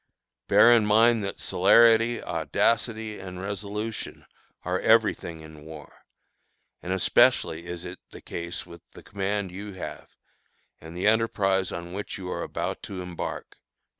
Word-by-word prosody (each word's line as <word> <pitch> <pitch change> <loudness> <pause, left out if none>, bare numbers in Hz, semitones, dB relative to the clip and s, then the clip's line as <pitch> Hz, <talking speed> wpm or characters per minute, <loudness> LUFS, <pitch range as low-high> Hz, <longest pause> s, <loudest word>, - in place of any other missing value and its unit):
Bear 120 - +7
in 115 -2 +4
mind 110 +1 +4
that 100 - -5
celerity, 115 +4 +4
audacity, 110 -2 -1
and 90 -1 -8
resolution 105 +3 -5 0.4
are 90 +1 -1
every 110 -1 +4
thing 80 -2 -9
in 80 -1 -13
war; 80 -1 -13 0.7
and 90 - -5
especially 85 -2 +2
is 85 0 -6
it 90 +1 -8
the - - -12
case 85 +1 -6
with 85 -1 -13
the - - -13
command 100 -1 -3
you 100 +2 -8
have, 95 - -8 0.7
and 80 +2 -10
the 90 - -2
enterprise 100 -4 +2
on 85 +1 -7
which 100 +2 -5
you 90 -2 -6
are - - -3
about - - -4
to 95 - -7
embark." 90 -1 -6
95 Hz, 145 wpm, -26 LUFS, 90-110 Hz, 0.7 s, Bear